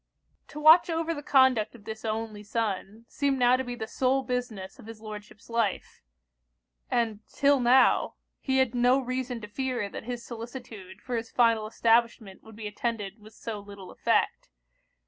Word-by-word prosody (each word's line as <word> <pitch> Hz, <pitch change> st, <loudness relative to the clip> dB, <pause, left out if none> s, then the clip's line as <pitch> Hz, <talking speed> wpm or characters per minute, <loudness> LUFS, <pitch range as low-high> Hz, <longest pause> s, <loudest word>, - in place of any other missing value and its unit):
To 300 Hz, -, -9 dB
watch 315 Hz, +4 st, +7 dB
over 330 Hz, 0 st, -1 dB
the 290 Hz, -, -6 dB
conduct 260 Hz, -6 st, +3 dB
of 225 Hz, -, -15 dB
this 220 Hz, +1 st, -7 dB
only 220 Hz, -1 st, -3 dB
son, 210 Hz, 0 st, -3 dB
seemed 280 Hz, -2 st, 0 dB
now 245 Hz, 0 st, +5 dB
to 260 Hz, -, -1 dB
be 245 Hz, -1 st, -5 dB
the 220 Hz, -, -5 dB
sole 265 Hz, +4 st, +1 dB
business 245 Hz, -7 st, -4 dB
of -, -, -13 dB
his 225 Hz, -1 st, -9 dB
Lordship's 210 Hz, 0 st, -10 dB
life: 230 Hz, -4 st, -2 dB, 0.9 s
and 225 Hz, -3 st, 0 dB
'till 280 Hz, 0 st, +3 dB
now, 250 Hz, +2 st, +4 dB, 0.2 s
he 265 Hz, -1 st, 0 dB
had 260 Hz, -2 st, +2 dB
no 245 Hz, +1 st, +4 dB
reason 255 Hz, -1 st, -3 dB
to 210 Hz, -, -7 dB
fear 245 Hz, -1 st, -3 dB
that 220 Hz, -, -8 dB
his 240 Hz, -1 st, -5 dB
solicitude 225 Hz, -5 st, -9 dB
for 250 Hz, -, -3 dB
his 230 Hz, 0 st, -5 dB
final 230 Hz, -3 st, +2 dB
establishment 230 Hz, -3 st, +1 dB
would 220 Hz, -1 st, -14 dB
be 215 Hz, 0 st, -8 dB
attended 210 Hz, -1 st, -4 dB
with 215 Hz, +1 st, -16 dB
so 220 Hz, -3 st, -6 dB
little 200 Hz, -2 st, -11 dB
effect. -, -, 0 dB
230 Hz, 170 wpm, -28 LUFS, 215-255 Hz, 0.9 s, watch